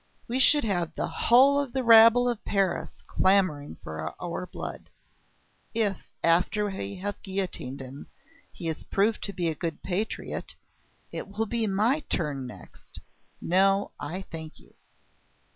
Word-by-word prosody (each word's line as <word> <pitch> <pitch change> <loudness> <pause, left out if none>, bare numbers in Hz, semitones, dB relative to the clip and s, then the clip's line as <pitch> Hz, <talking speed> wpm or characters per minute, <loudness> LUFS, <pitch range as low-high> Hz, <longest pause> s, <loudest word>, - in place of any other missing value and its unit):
We 245 +3 -1
should 290 +2 +6
have 175 -6 -1
the - - -1
whole 270 +4 +5
of 280 -4 -3
the 265 -1 0
rabble 230 +1 +7
of 240 -3 -2
Paris 195 -3 -1
clamouring 185 - +2
for 80 0 -5
our 175 +1 -4
blood. - - -7 0.9
If, 210 -4 -1
after 180 +5 +3
we 100 - -4
have 205 +2 -5
guillotined 185 -9 -3
him, 130 +2 -10 0.4
he 170 - -6
is 160 -1 -3
proved 210 +3 +1
to 200 - -4
be 175 -3 -2
a 160 - 0
good 165 0 -5
patriot, 195 +4 -3 0.6
it - - -5
will 205 +3 -2
be 225 0 -1
my 215 +9 +2
turn 140 -5 -1
next. 125 - -11 0.4
No! 195 +3 +2
I 175 +7 -5
thank 160 -3 -9
you!" - - -21
195 Hz, 145 wpm, -27 LUFS, 165-225 Hz, 0.9 s, rabble